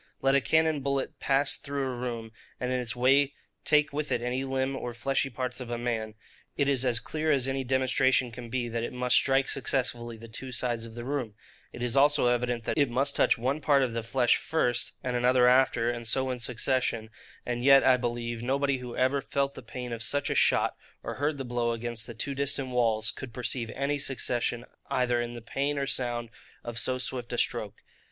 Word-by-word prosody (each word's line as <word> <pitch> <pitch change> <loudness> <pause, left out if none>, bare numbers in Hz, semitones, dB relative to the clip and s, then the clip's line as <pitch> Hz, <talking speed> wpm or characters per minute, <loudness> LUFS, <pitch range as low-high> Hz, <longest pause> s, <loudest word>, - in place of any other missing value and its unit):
Let 135 0 +2
a 140 - +4
cannon 160 -1 +2
bullet 140 0 -2
pass 140 +1 +2
through 140 -1 -3
a 130 -1 -3
room, 120 -2 -5 0.3
and 125 0 -2
in 130 - +1
its 120 -1 -3
way 135 +3 +3 0.3
take 150 -1 +3
with 150 +1 -3
it - - +2
any 125 +2 -1
limb, 135 0 -1
or 120 -3 -5
fleshy 135 +2 0
parts 125 0 -4
of 125 -2 -7
a 120 - -2
man, 115 -2 -3 0.4
it 140 - +2
is 135 -2 +2
as 120 -3 +2
clear 155 +4 -3
as 135 -4 +3
any 135 0 -1
demonstration 130 -1 +2
can 120 0 -9
be, 120 0 -1
that 115 0 -3
it 120 - -4
must 125 0 +1
strike 135 0 +3
successively 120 -3 -1
the 115 +1 -11
two 130 +3 -6
sides 120 -2 -1
of 115 - -12
the 120 0 -6
room: 130 -6 -3 0.4
it 120 - -6
is 125 0 0
also 145 0 +5
evident, 120 -1 0
that 150 - -1
it 140 -3 +3
must 130 +4 +1
touch - - +3
one 130 +6 -1
part 140 -3 +4
of 125 -3 -1
the 115 - -2
flesh 120 +2 +2
first, 120 -7 0
and 125 -1 -2
another 125 0 +4
after, 125 -2 +4
and 120 -1 -4
so 130 +3 +1
in 125 - -4
succession: 115 -2 -1 0.3
and 120 0 -2
yet, 135 0 +7
I 130 -1 +6
believe, 120 -1 -3
nobody 135 +2 0
who 125 -1 -7
ever 130 +2 +2
felt 140 +1 -1
the - - -9
pain 125 +1 -6
of 115 - -5
such 145 +6 0
a - - +2
shot, - - +3 0.3
or - - -4
heard 145 0 +1
the 135 - -4
blow 120 -1 0
against 115 -1 -4
the 120 - -8
two 140 +5 -2
distant 140 -1 0
walls, 115 -3 +2
could 120 -4 -9
perceive 120 -1 -2
any 140 +1 -1
succession 125 -3 -1 0.2
either 125 -1 +1
in 120 0 -4
the 120 -1 -9
pain 140 +4 -1
or 140 - 0
sound 120 -3 -1 0.3
of 120 -1 -3
so 130 - +1
swift 125 -1 -4
a - - -2
stroke. - - -2
125 Hz, 220 wpm, -28 LUFS, 120-135 Hz, 0.4 s, yet